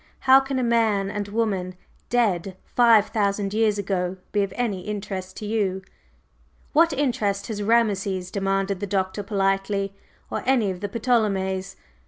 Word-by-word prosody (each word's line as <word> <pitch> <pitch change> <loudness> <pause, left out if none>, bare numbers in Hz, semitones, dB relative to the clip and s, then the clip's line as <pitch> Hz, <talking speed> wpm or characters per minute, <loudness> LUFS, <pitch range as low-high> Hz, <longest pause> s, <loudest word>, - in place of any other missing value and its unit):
"How 265 0 +7
can 270 0 -3
a 255 - 0
man 220 -4 +2
and 205 -1 -3
woman 200 -4 -1 0.3
dead 195 -6 0
five 230 -4 +5
thousand 200 -1 0
years 215 -1 +2
ago 190 -2 -2
be 205 - +1
of 200 -1 -1
any 220 -7 -1
interest 195 -2 -5
to 215 - -6
you?" 200 -3 -1 0.9
"What 330 +2 +5
interest 230 -8 0
has 210 -2 -3
Rameses?" 200 -4 +1
demanded 195 -1 -1
the 205 - -3
Doctor 190 +1 -1
politely, 195 0 0 0.4
"or - - -2
any 240 -7 +3
of 180 - -7
the 205 - -3
Ptolemies? 195 -4 0
200 Hz, 150 wpm, -24 LUFS, 195-225 Hz, 0.9 s, How